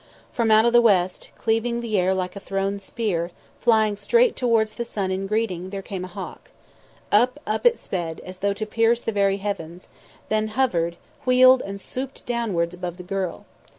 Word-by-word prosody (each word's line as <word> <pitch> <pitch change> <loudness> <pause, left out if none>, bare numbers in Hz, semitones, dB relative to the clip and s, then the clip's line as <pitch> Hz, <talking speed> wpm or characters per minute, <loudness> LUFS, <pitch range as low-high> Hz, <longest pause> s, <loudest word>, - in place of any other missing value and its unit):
From 230 -2 0
out 220 +1 +6
of 235 - +3
the 240 - +7
west, 185 -5 +2
cleaving 230 +1 0
the 230 -3 -3
air 185 +1 +2
like 185 0 -3
a - - -5
thrown 195 0 -2
spear, 190 -4 -2 0.3
flying 220 -3 +3
straight 470 - +3
towards 225 -3 +1
the 235 - -3
sun 200 -5 -3
in 190 +1 -2
greeting, 195 -4 -1
there 195 0 -6
came 190 -2 -5
a - - -5
hawk. 180 - -9 0.6
Up, 250 +7 +3
up 215 - +2
it 470 - +3
sped, 170 -4 -4
as 185 0 -9
though 200 +1 +1
to 215 +2 -4
pierce 230 +2 +2
the - - -1
very 200 -2 +2
heavens; 185 -4 -5 0.4
then 215 0 +1
hovered, 170 -10 +1 0.3
wheeled 255 0 +6
and 200 0 -6
swooped 260 +6 -6
downwards 205 -8 -1
above 180 -1 -5
the 180 - -8
girl. 190 -1 -3
205 Hz, 185 wpm, -24 LUFS, 185-235 Hz, 0.6 s, the